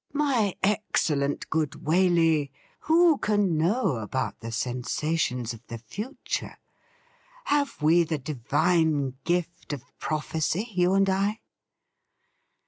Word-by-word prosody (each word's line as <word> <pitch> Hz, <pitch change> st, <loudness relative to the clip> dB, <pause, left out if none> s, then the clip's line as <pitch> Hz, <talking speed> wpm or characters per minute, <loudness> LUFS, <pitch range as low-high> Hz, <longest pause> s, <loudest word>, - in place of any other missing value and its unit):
' -, -, -39 dB
My 225 Hz, -9 st, +1 dB
excellent 155 Hz, -8 st, 0 dB
good 160 Hz, -2 st, 0 dB
Waley, 165 Hz, -3 st, +3 dB, 0.3 s
who 325 Hz, -1 st, +4 dB
can 205 Hz, -5 st, +1 dB
know 165 Hz, -, +1 dB
about 110 Hz, +4 st, -3 dB
the 115 Hz, 0 st, -7 dB
sensations 125 Hz, +1 st, -1 dB
of 115 Hz, -, -12 dB
the 115 Hz, -, -6 dB
future? 205 Hz, -, -5 dB, 0.9 s
Have 285 Hz, -1 st, 0 dB
we 165 Hz, +3 st, +5 dB
the 160 Hz, -1 st, -2 dB
divine 150 Hz, +1 st, +1 dB
gift 175 Hz, -2 st, -2 dB
of 135 Hz, -4 st, -6 dB, 0.2 s
prophecy, 160 Hz, +6 st, -1 dB
you 180 Hz, +1 st, +3 dB
and 195 Hz, 0 st, +4 dB
I 200 Hz, +3 st, 0 dB
165 Hz, 115 wpm, -26 LUFS, 140-195 Hz, 0.9 s, we